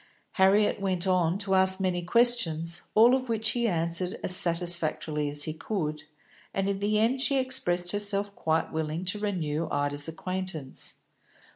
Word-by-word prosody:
Harriet 200 +2 +2
went 185 -2 -2
on 180 -2 +1
to 200 -1 -2
ask 190 0 +2
many 185 -2 -2
questions, 175 -6 +2
all 230 +3 +5
of 255 -1 -2
which 220 -1 0
he 235 -1 -1
answered 170 0 -1
as 185 - +7
satisfactorily 165 -4 +3
as 145 0 -2
he 155 - -3
could, 155 -4 -5 0.5
and 195 0 -1
in 200 -1 -2
the 210 +1 0
end 235 +5 0
she 275 0 +3
expressed 180 -10 0
herself 205 0 +1
quite 160 0 -2
willing 160 +2 -4
to 190 +3 -1
renew 165 -6 -3
Ida's 145 +1 -1
acquaintance. 165 -4 -5
185 Hz, 155 wpm, -26 LUFS, 160-205 Hz, 0.5 s, as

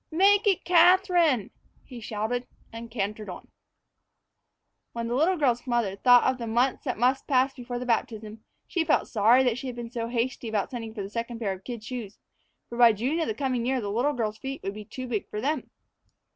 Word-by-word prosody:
"Make 400 +5 +4
it 390 -3 +2
Catherine!" 350 - +4 0.3
he 245 -3 -10
shouted, 220 +3 -3 0.3
and 230 0 -8
cantered 210 -2 -4
on. 180 - -9 1.4
When 235 0 -3
the 235 - -2
little 325 +8 +2
girl's 250 -5 +1
mother 235 -6 0
thought 245 +3 +6
of 260 -1 +1
the 235 - -4
months 245 +6 0
that 250 - -2
must 255 +4 +1
pass 265 0 +2
before 245 -1 -6
the 250 - -5
baptism, 220 -2 -2 0.2
she 345 - -1
felt - - +1
sorry 230 +4 +4
that 250 -1 0
she 265 - -6
had 250 - -5
been 235 -1 -7
so 230 -2 -3
hasty 240 0 -2
about 210 -2 -1
sending 225 -3 -6
for 205 - -4
the 195 - -7
second 230 +1 -4
pair 210 -4 -2
of 190 0 -11
kid 235 -2 -7
shoes; 225 -4 -7 0.5
for 235 - -8
by 235 -2 +7
June 255 +10 -1
of 325 - 0
the 220 - -2
coming 255 -2 -1
year 260 +2 0
the 205 -3 -4
little 250 +8 +1
girl's 220 -4 -3
feet 270 0 -6
would 195 - -3
be 210 0 -9
too 255 +5 -7
big 220 -5 -3
for 210 - -4
them. 285 +4 -2
240 Hz, 215 wpm, -26 LUFS, 220-265 Hz, 1.4 s, by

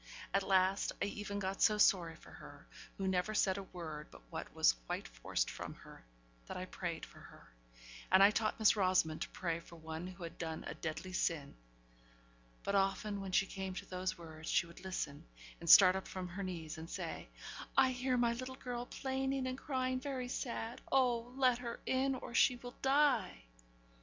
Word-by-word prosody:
At 195 - +4
last 190 0 +3
I - - +1
even 205 0 -4
got 195 -1 -3
so 215 -1 +5
sorry 175 -5 +4
for - - -15
her - - -12 0.3
who 195 - -1
never 190 +3 0
said 190 -2 +2
a 195 - -9
word 155 -4 -6
but - - -15
what - - -5
was - - +5
quite - - -3
forced - - -1
from - - -6
her - - -14 0.4
that - - -5
I 185 - -4
prayed 175 -2 -4
for - - -16
her; - - -15 0.6
and 190 - +8
I 200 - +8
taught 215 0 0
Miss 220 -1 +5
Rosamond 185 -5 +2
to - - -2
pray 170 -5 -2
for 170 0 -13
one 160 +1 -6
who 185 -1 -9
had 170 0 -7
done 160 -2 -4
a - - -4
deadly 170 +3 -5
sin; 165 -5 0 1.1
but 200 - -1
often 200 +1 +1
when 195 -1 -5
she 195 - +4
came 190 -1 -5
to - - -5
those 185 0 -3
words, 160 -2 -8
she - - +3
would 170 +2 -13
listen, 175 -6 -4 0.4
and 170 - -5
start 185 0 +10
up 190 - -4
from 185 -1 -5
her 190 +3 -5
knees, 170 -4 -5
and 165 +1 -8
say, - - -5 0.5
'I 265 -1 +6
hear 255 0 0
my 240 -1 +3
little 255 +2 -5
girl 245 -2 -5
plaining 265 0 -1
and 255 0 -2
crying 255 -2 -1
very 255 -2 -4
sad 235 -2 -4
oh, 245 -3 +2
let 255 -2 +4
her 235 -1 -5
in, 265 +1 +1
or 245 - -7
she 250 +1 +5
will 245 0 -9
die!' 270 - +3
195 Hz, 195 wpm, -36 LUFS, 175-245 Hz, 1.1 s, start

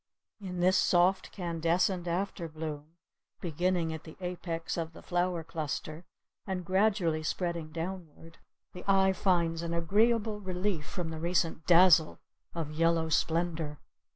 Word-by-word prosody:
In 180 -3 -5
this 185 +1 +4
soft 180 +2 +3
canescent 175 +1 0
afterbloom 160 -4 -4 0.4
beginning 175 0 0
at 160 - -7
the 160 - -12
apex 175 -2 -4
of 165 -1 -4
the - - -13
flower 175 -1 0
cluster 155 +1 -5 0.4
and 185 -2 -3
gradually 190 -4 +2
spreading 170 0 -3
downward, 165 -1 -7 0.3
the 180 - -9
eye 190 -1 +4
finds 170 -3 +1
an 170 0 -3
agreeable 215 +5 +2
relief 185 -4 -2
from 175 -4 -4
the 160 -1 -5
recent 165 -2 0
dazzle 170 -2 +6 0.4
of 160 -3 -3
yellow 165 +1 +2
splendour. 160 -1 0
170 Hz, 125 wpm, -30 LUFS, 160-185 Hz, 0.4 s, dazzle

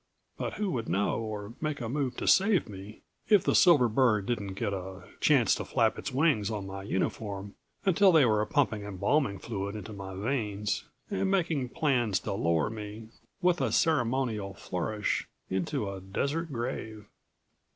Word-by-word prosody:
But - - -4
who 210 -3 -2
would 115 -4 -3
know 100 +4 +1
or 110 -1 -5
make 155 -2 -2
a 115 - -3
move 130 0 -2
to - - -3
save 195 -1 +4
me 100 0 -10 0.3
if 210 -4 +6
the - - +2
silver 150 -9 +6
bird 110 -4 +2
didn't 100 -5 -3
get 100 -1 -2
a 95 0 -6 0.2
chance - - +4
to - - -2
flap - - +1
its - - -4
wings 130 -7 +2
on 105 -3 -3
my 95 0 -6
uniform 100 0 -3 0.3
until 190 +1 +5
they 160 -5 +6
were 105 -2 +3
pumping 120 -7 +1
embalming 100 +4 0
fluid 100 0 -4
into 105 0 -7
my 95 -1 -7
veins 105 -2 -2 0.3
and 195 -1 0
making 165 -9 0
plans 120 -9 +1
to - - -3
lower 85 0 +1
me, 110 0 -8 0.3
with 180 -1 +3
a - - +1
ceremonial 120 - +1
flourish, 105 +5 -2 0.2
into 95 +2 -1
a 95 -1 -5
desert 140 - -2
grave? 110 -3 -4
110 Hz, 165 wpm, -29 LUFS, 100-140 Hz, 0.3 s, if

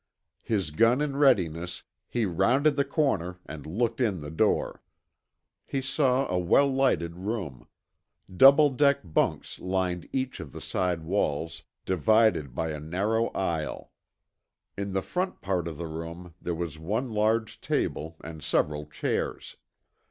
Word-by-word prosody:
His 95 -8 -1
gun 115 - +4
in 150 -2 -1
readiness, 90 - +2 0.3
he 120 -2 0
rounded 120 - +2
the 140 - +2
corner 90 - 0
and 75 -2 -8
looked 115 +8 -1
in 105 -7 +1
the 75 0 -7
door. 80 - +1 0.8
He 135 - -3
saw 135 -1 +1
a 90 - 0
well 90 +11 +4
lighted 125 -11 +1
room. 95 - -4 0.7
Double 140 +6 +7
deck 140 +1 +3
bunks 85 -4 -1
lined 90 -2 -2
each 130 -1 -2
of - - -8
the - - -7
side 90 -3 -1
walls, 80 -2 -1 0.2
divided 95 - +3
by 80 -1 -1
a 75 - -5
narrow 100 +9 0
aisle. 85 -5 -2 0.8
In 100 -1 -4
the 95 -1 0
front 180 - -2
part 90 -3 -1
of 80 -3 -6
the 85 - -4
room 85 +2 -7
there 85 - -2
was 80 -2 -5
one 110 +10 -2
large 110 +1 0
table, 80 +2 -2
and 80 -1 -8
several 75 0 0
chairs. 75 - -3
95 Hz, 145 wpm, -27 LUFS, 80-120 Hz, 0.8 s, Double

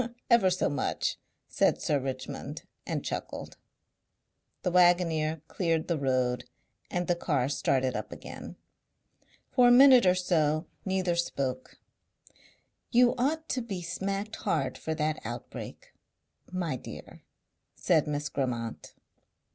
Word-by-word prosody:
"Ever 230 -5 +6
so 185 0 +1
much," 145 -2 -1 0.3
said - - +2
Sir 145 -2 +1
Richmond 130 -1 -5 0.2
and - - -3
chuckled. - - -5 1.1
The 180 - 0
waggoner 165 -3 +3
cleared 165 -3 0
the 170 -3 0
road 125 -2 0 0.4
and 175 0 -1
the 175 - +3
car 145 -7 0
started 130 -2 +1
up - - -4
again. - - -9 1.0
For 250 -2 +5
a - - +7
minute 255 -4 +8
or 180 - +5
so 155 -3 +1 0.2
neither 190 -2 0
spoke. 135 -6 -2 1.1
"You 245 0 +5
ought 315 +5 0
to 255 - 0
be 195 -6 -5
smacked 195 +5 -3
hard 155 -9 -1
for 160 - -4
that 155 0 -1
outbreak, - - -8 0.6
my 175 -7 -2
dear," - - -10 0.5
said 160 -3 +2
Miss 145 0 -2
Grammont. 120 -5 -4
165 Hz, 125 wpm, -29 LUFS, 140-190 Hz, 1.1 s, minute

